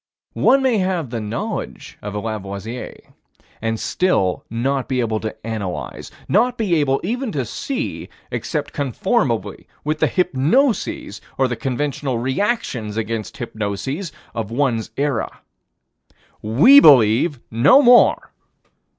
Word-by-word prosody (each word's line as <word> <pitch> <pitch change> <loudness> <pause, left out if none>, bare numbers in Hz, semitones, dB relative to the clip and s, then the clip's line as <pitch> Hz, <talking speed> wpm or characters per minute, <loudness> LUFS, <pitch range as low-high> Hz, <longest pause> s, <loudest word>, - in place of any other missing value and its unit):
One 270 0 +3
may 245 -5 +2
have 180 -8 -1
the 115 -2 -3
knowledge 110 +2 -5
of 105 0 -6
a - - -1
Lavoisier, 110 +2 -6 0.6
and 115 0 -2
still 100 - 0
not 130 +4 -1
be 130 -1 -1
able 110 -2 0
to 110 0 -5
analyze, 105 -6 -5 0.2
not 240 +5 +2
be 210 -6 0
able 135 -3 +1
even 240 +5 -2
to 135 -4 -1
see, 255 - -4 0.2
except - - -3
conformably 140 -6 -1 0.2
with 155 +1 -2
the - - +3
hypnoses, 245 - 0 0.2
or 130 - +3
the 120 - -3
conventional 135 +1 -2
reactions 130 - -2
against 110 -2 -4
hypnoses, 120 - -4 0.2
of 110 -3 -4
one's 120 -3 0
era. 140 -5 -2 1.0
We 150 - +7
believe 130 - +5
no 140 - +5
more. 245 -1 +5
130 Hz, 125 wpm, -20 LUFS, 110-185 Hz, 1.0 s, We